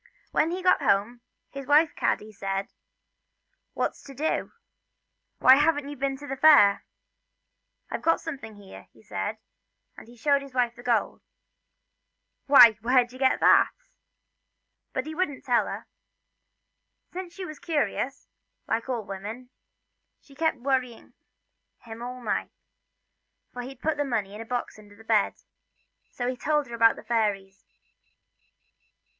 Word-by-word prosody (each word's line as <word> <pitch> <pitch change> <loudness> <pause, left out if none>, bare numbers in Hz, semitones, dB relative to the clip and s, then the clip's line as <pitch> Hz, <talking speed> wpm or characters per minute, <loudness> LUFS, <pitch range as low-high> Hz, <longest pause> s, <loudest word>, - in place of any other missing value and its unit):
When 315 - +2
he 365 +2 -4
got 365 - +4
home, 215 +5 +1 0.3
his 275 -1 -8
wife 300 +2 +4
Kaddy 215 +1 -1
said: 195 -1 -4 0.5
" - - -51
What - - -1
's - - -17
to 275 - -11
do, 310 +4 -2 0.9
why 260 +1 +7
haven't 295 -1 +2
you 290 - -6
been 275 0 -2
to 290 - -10
the 270 -1 -4
fair 275 -9 +6 0.3
?" - - -54
" - - -37
I've - - -3
got 330 - +2
something 270 -9 -8
here," 200 -2 -13
he - - -21
said, - - -4 0.6
and - - -13
showed 280 +3 +2
his 275 -2 -12
wife 245 -1 +1
the - - -12
gold. 240 -2 0 0.6
" - - -54
Why, 235 -6 +8
where 250 +2 +4
did 245 +1 -15
you 255 - -12
get 265 -1 +2
that - - +6 0.6
?" - - -55
But - - -1
he 315 - -6
wouldn't 300 -5 -3
tell 245 -3 +2
her. - - -6 1.3
Since 355 -1 -7
she 385 - -6
was 310 -4 -9
curious, 290 -4 -2 0.4
like 230 +3 -2
all 235 -5 -2
women, 210 +6 -8 0.7
she 280 - -20
kept 320 +1 0
worrying 250 -2 -2 0.6
him 230 -1 -11
all 250 +1 -7
night - - -2 1.0
for 245 - -5
he'd 255 +1 -9
put 315 -1 0
the 290 - +1
money 220 -7 -2
in 210 - -8
a - - -8
box 245 -2 -4
under 205 -1 -16
the 225 - -16
bed 220 -2 +2 0.7
so 245 - -4
he 255 - -1
told 295 +3 0
her 235 - -11
about 230 -1 +4
the - - -12
fairies. 200 -4 -2
250 Hz, 160 wpm, -26 LUFS, 225-290 Hz, 1.3 s, Why